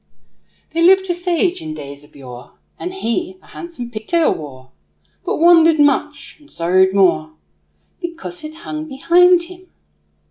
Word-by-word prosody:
There 335 - -1
lived 380 +1 +4
a - - +1
sage 355 0 -1
in 155 -1 -6
days 140 -1 -10
of 145 - -22
yore 125 -3 -12 0.3
And 360 - -5
he 360 +2 -3
a - - -24
handsome 330 -9 -9
pigtail 270 +10 0
wore; 130 -4 -11 0.5
But - - -2
wondered 330 -1 +5
much 290 +1 0
and 295 0 -21
sorrowed 185 +3 +2
more 80 - +2 0.7
Because 310 - -8
it 310 0 -8
hung 310 0 -5
behind 345 +5 +4
him. 365 +1 -14
305 Hz, 145 wpm, -18 LUFS, -, 0.7 s, wondered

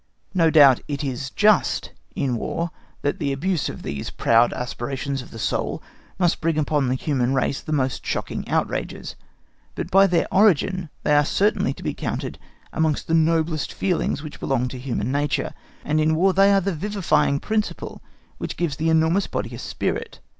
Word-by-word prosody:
No 165 -4 +4
doubt 145 -5 +7
it 145 0 -3
is 130 -1 -3
just 210 +6 +2 0.2
in 130 -3 0
War 165 +8 -3 0.3
that 145 - -1
the 145 -4 -1
abuse 165 +4 -1
of - - -8
these 70 +1 -4
proud 115 +1 +3
aspirations 135 +2 -4
of 125 - -12
the - - -10
soul - - -1 0.4
must 175 -2 +1
bring 165 -1 +1
upon 145 -2 +1
the 130 - +1
human 130 -2 0
race 135 +1 0
the - - -7
most 130 -3 0
shocking - - -3
outrages, - - -2 0.6
but - - -5
by 195 +1 +6
their 175 -2 +2
origin 185 -3 +3
they 150 - +2
are 145 - +5
certainly 205 +8 +1
to - - -11
be - - -1
counted - - -4 0.3
amongst 160 -2 0
the 165 - -1
noblest 160 -1 +2
feelings 180 -5 -1
which 155 - -8
belong 125 -2 0
to 130 - -7
human 125 -2 -2
nature, 145 0 -1 0.3
and 155 +1 +1
in 155 +1 +2
War 190 +4 +3
they 195 +1 +5
are 195 -1 +4
the 195 +1 -1
vivifying 180 -5 +1
principle 215 +4 -3 0.4
which - - -5
gives 165 -5 -1
the 160 +1 0
enormous 160 +4 +3
body - - -4
a - - -7
spirit. - - -3
155 Hz, 180 wpm, -23 LUFS, 135-175 Hz, 0.6 s, doubt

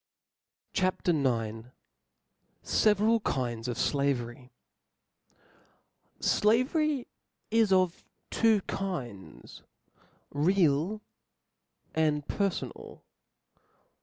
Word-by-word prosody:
CHAP. 185 -2 0
IX. 120 -8 0 1.0
Several 215 +2 +3
Kinds 120 - -2
of 120 - -3
Slavery. 130 -3 -1 1.7
O - - +1
L 210 - +6
AV 250 +7 +1
E - - +4
R - - +3 0.2
Y 245 - -9 0.5
is 225 -2 +3
of 185 -2 +2 0.3
two 220 -3 +3
kinds, 130 - -6 0.7
real 170 +4 +2 0.9
and 150 -2 +1
perfo 200 +1 -1
^ - - -11
nal. - - -12
165 Hz, 90 wpm, -29 LUFS, 130-205 Hz, 1.7 s, L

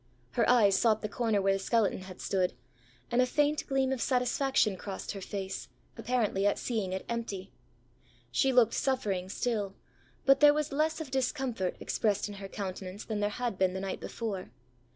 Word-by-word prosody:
Her - - +2
eyes 215 -6 +6
sought 220 -2 +3
the - - 0
corner 215 -2 0
where 195 0 +4
the 195 - -1
skeleton 215 0 +1
had 185 -1 -10
stood, 185 -2 0 0.6
and 240 +1 +4
a - - +5
faint 295 +3 +1
gleam 270 -1 +1
of 265 -3 -1
satisfaction 250 -4 +2
crossed 195 +1 -5
her 195 - -6
face, 190 0 -5 0.3
apparently 215 -5 +1
at 205 - +2
seeing 215 -6 -2
it 190 0 -3
empty. 205 -5 -4 0.8
She 265 - +3
looked 245 -3 +5
suffering 200 -9 0
still, 205 -2 -1 0.5
but 275 0 +6
there 295 0 +7
was 300 -1 -1
less 315 +3 0
of 290 -5 -7
discomfort 255 -7 -1
expressed 210 -2 0
in 205 - -7
her 195 - -5
countenance 190 0 -6
than 215 -2 -2
there 205 0 +1
had 235 -2 -3
been 185 -1 +3
the - - -2
night 195 0 -3
before. 205 - -4
215 Hz, 180 wpm, -30 LUFS, 195-255 Hz, 0.8 s, there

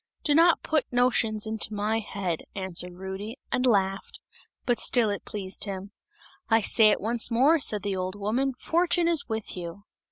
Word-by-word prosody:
"Do 295 - +2
not 330 +2 +4
put 310 -3 0
notions 230 -3 +1
into 220 -1 -2
my 215 +2 0
head!" 195 -6 -4
answered 180 -2 -1
Rudy, 190 +5 -6
and 250 +1 +1
laughed, 195 -4 0 0.5
but 245 -1 +1
still 230 -4 +2
it 205 - -5
pleased 195 -1 -3
him. 195 0 -6 0.6
"I 225 0 +5
say 220 0 +4
it 210 - +2
once 230 +3 0
more," 270 +8 +4
said 210 -7 +1
the 200 -1 -2
old 185 +1 -3
woman, 240 +6 -1
"fortune 345 0 +1
is 335 -6 +2
with 220 -1 -4
you!" 175 +2 -7
215 Hz, 170 wpm, -26 LUFS, 195-245 Hz, 0.6 s, I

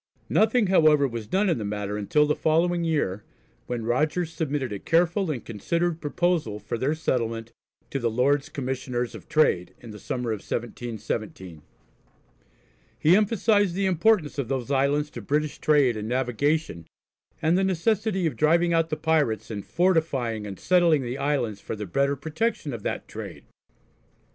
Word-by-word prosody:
Nothing 220 +1 +3
however 155 -6 +4
was 115 -4 -6
done 195 - +1
in 165 -9 +1
the - - -3
matter 105 0 -3
until 105 +9 +2
the 150 - +1
following 170 +2 +1
year, 145 - -1 0.4
when 120 -2 -3
Rogers 155 +7 0
submitted 140 -8 -2
a 100 - -5
careful 175 - +1
and 135 -6 -4
considered 170 - -2
proposal 155 -7 0
for 105 +2 -5
their 135 +6 0
settlement 115 -7 -2 0.4
to 135 - -1
the 120 -2 0
Lords 135 +5 +1
Commissioners 125 -2 -3
of - - -11
Trade, 145 - +2
in 115 - -11
the 105 - -10
summer 125 +1 -3
of 110 - -2
1717. 110 -7 -5 1.4
He 165 +4 +5
emphasised 205 -2 +2
the 195 +1 0
importance 185 -4 +2
of 135 - -2
those 135 -1 -3
islands 140 +2 +1
to 120 - -7
British 150 +7 -1
trade 145 -6 +3
and 105 0 -4
navigation, 130 - -1 0.5
and 165 +1 +2
the 190 - +2
necessity 190 +1 0
of 160 - -1
driving 170 +3 +3
out 165 0 +2
the 155 - -2
pirates 145 -10 0
and 100 -2 -5
fortifying 140 - 0
and 95 -2 -8
settling 170 -6 +3
the 125 +3 -4
islands 135 -8 -1
for - - -5
the 105 0 -5
better 140 +9 +1
protection 160 - -2
of 115 - -6
that - - -4
trade. - - -8
145 Hz, 165 wpm, -25 LUFS, 115-165 Hz, 1.4 s, He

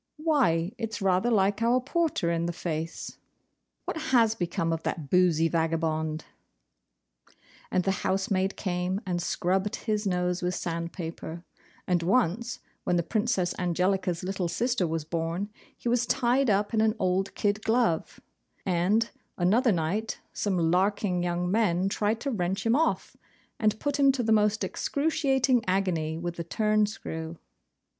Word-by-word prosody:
Why, 255 - +2
it's 225 -1 -3
rather 190 +3 +2
like 205 -1 +2
our 240 +2 +3
porter 285 - 0
in 170 0 0
the 175 - -2
face! 165 -1 -5 0.7
What - - -3
has 245 -8 +3
become 170 -4 -1
of 165 - -3
that 150 -4 -4
boozy 175 -3 +4
vagabond?' 160 -1 -1 1.4
And 185 - +1
the 195 - +1
house 190 +2 0
maid 190 0 +1
came 180 0 -1
and 175 -2 -1
scrubbed 190 +3 0
his 215 -2 -2
nose 180 -1 0
with 180 0 -1
sandpaper; 170 0 -5 0.4
and 180 -2 +1
once, 230 +4 +1 0.3
when - - +1
the 170 - +2
Princess 205 -3 0
Angelica's 180 0 0
little 190 -1 -2
sister 230 +1 0
was 160 -1 -2
born, 170 +5 -2 0.3
he - - -6
was 240 0 +2
tied 255 0 +2
up 205 +2 +1
in 220 - +3
an 220 -1 +2
old 190 +1 0
kid 205 +1 0
glove; 225 -7 +1 0.5
and, 190 +6 +2 0.3
another 220 +8 +3
night, 190 +6 -1
some 200 -3 -1
LARKING 190 0 +1
young 175 0 -1
men 190 -4 +2
tried 210 +2 0
to 280 - -2
wrench 195 -1 -1
him 230 +1 +4
off, 320 +3 0 0.4
and 215 -1 +1
put 290 0 -1
him 275 -1 +6
to 255 -2 -1
the 225 - +1
most 210 -1 +3
excruciating 270 - +1
agony 175 -5 0
with 170 0 -5
a - - -1
turn 215 +4 +2
screw. 160 -4 -6
190 Hz, 150 wpm, -28 LUFS, 175-225 Hz, 1.4 s, him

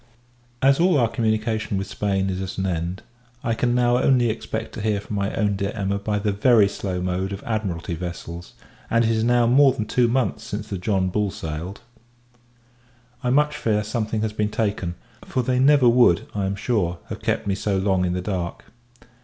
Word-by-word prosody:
As 135 +2 +5
all 175 -2 +4
our 120 -4 +3
communication 110 -2 -1
with 95 - -2
Spain 95 -1 -1
is 95 0 -3
at 95 -1 -5
an 95 - -1
end, 90 +2 -3 0.4
I 115 - 0
can 120 +1 +1
now 120 0 +3
only 125 -3 +3
expect 110 0 -5
to - - -6
hear 105 -1 0
from 105 +1 -6
my 100 +1 -1
own 105 -2 +1
dear 100 0 -2
Emma 100 -1 -1
by 105 +1 -1
the 105 0 0
very 105 0 +4
slow 95 -2 -4
mode 90 +2 -2
of 100 - -6
Admiralty 100 -7 -3
vessels, 85 0 -7 0.4
and 115 0 +3
it 115 - +2
is 110 -1 +1
now 120 0 +3
more 135 +3 +5
than 110 -5 -3
two 120 +2 +2
months 125 +1 0
since 105 +1 -5
the 100 -3 -4
John 95 -1 0
Bull 105 +2 0
sailed. 80 +3 -6 1.4
I 125 - +1
much 150 +3 +3
fear, 105 -2 0
something 110 0 -2
has 110 -1 -2
been 105 -1 0
taken; 105 -5 -2 0.3
for 130 - -2
they 125 +1 +1
never 135 -1 +5
would, 120 -8 +5
I 100 -2 -1
am 100 - -2
sure, 100 -5 -1
have - - -6
kept - - -1
me 100 - 0
so 100 0 -1
long 95 -1 +1
in 90 -1 0
the 90 - -2
dark. 90 -4 -4
105 Hz, 205 wpm, -23 LUFS, 95-115 Hz, 1.4 s, As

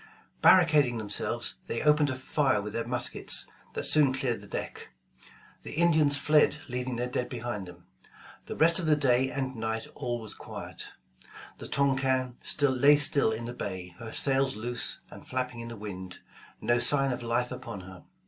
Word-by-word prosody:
Barricading 155 -9 +5
themselves, 105 -2 -1
they 115 - -2
opened 150 -1 +4
a 130 - -2
fire 130 -2 +1
with 105 +1 -6
their 115 0 -3
muskets 125 0 +2 0.3
that - - -2
soon 150 -3 +5
cleared 130 -5 -1
the 105 - -13
deck. - - -6 0.7
The - - -7
Indians 155 -3 +3
fled 150 0 +4
leaving 125 0 -3
their 120 +1 -2
dead 125 0 -3
behind 120 -6 -5
them. 85 0 -14 0.6
The - - -5
rest 165 +2 +5
of 170 - -2
the 155 - +5
day 130 -2 +2
and 130 -1 -3
night 110 0 -3
all 120 -1 -3
was 110 -2 -9
quiet. - - -8 0.7
The - - -7
Touquin 130 -2 +1 0.3
lay 140 +1 +5
still 145 -4 +2
in 110 +1 -4
the 120 - -5
bay, 95 -6 -6
her 115 -1 -7
sails 135 0 +1
loose 120 +3 -2
and - - -12
flapping 125 -1 -2
in 115 - -6
the 115 -1 -8
wind, 95 -3 -7 0.4
no 120 0 +1
sign 135 +2 +3
of 125 - -4
life 120 +1 -1
upon 115 -6 -7
her. 95 0 -12
125 Hz, 175 wpm, -28 LUFS, 115-140 Hz, 0.7 s, Barricading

